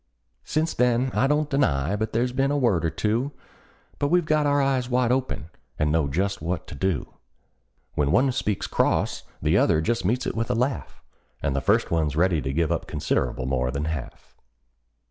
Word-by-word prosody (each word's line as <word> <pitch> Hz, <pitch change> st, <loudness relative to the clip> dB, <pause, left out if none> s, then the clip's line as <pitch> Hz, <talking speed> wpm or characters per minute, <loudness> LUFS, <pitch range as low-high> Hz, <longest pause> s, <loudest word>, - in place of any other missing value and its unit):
Since 160 Hz, +2 st, 0 dB
then 125 Hz, +1 st, +2 dB
I 135 Hz, -, +2 dB
don't 150 Hz, +1 st, +1 dB
deny 90 Hz, -, +1 dB
but 110 Hz, +1 st, -2 dB
there's 120 Hz, +3 st, 0 dB
been 135 Hz, +2 st, +1 dB
a 145 Hz, -, +1 dB
word 110 Hz, -, +2 dB
or 80 Hz, -, +2 dB
two; 115 Hz, -, -1 dB, 0.7 s
But 145 Hz, -, +1 dB
we've 175 Hz, +2 st, +2 dB
got 155 Hz, -1 st, +2 dB
our 145 Hz, 0 st, +3 dB
eyes 135 Hz, -3 st, +1 dB
wide 125 Hz, -1 st, +2 dB
open, 125 Hz, -10 st, -2 dB, 0.3 s
and 75 Hz, 0 st, +1 dB
know 80 Hz, -2 st, +2 dB
just 95 Hz, +7 st, -1 dB
what 85 Hz, +2 st, -3 dB
to -, -, -7 dB
do: 95 Hz, -9 st, -2 dB, 0.8 s
When 70 Hz, -1 st, +1 dB
one 130 Hz, -, +4 dB
speaks 105 Hz, -6 st, -1 dB
cross -, -, 0 dB, 0.2 s
the -, -, +3 dB
other 80 Hz, -, +3 dB
just 115 Hz, +7 st, 0 dB
meets 120 Hz, +7 st, 0 dB
it -, -, -1 dB
with 115 Hz, +1 st, -2 dB
a 125 Hz, -, +1 dB
laugh, 125 Hz, +4 st, -2 dB, 0.4 s
And 70 Hz, -, 0 dB
the 70 Hz, -, 0 dB
first -, -, +2 dB
one's 80 Hz, -4 st, +1 dB
ready 85 Hz, -1 st, +2 dB
to 65 Hz, -, -2 dB
give 80 Hz, +2 st, 0 dB
up -, -, -2 dB
considerable 65 Hz, -, -1 dB
more 65 Hz, -1 st, 0 dB
than 70 Hz, +3 st, -2 dB
half. 80 Hz, -5 st, -6 dB
110 Hz, 195 wpm, -25 LUFS, 80-130 Hz, 0.8 s, one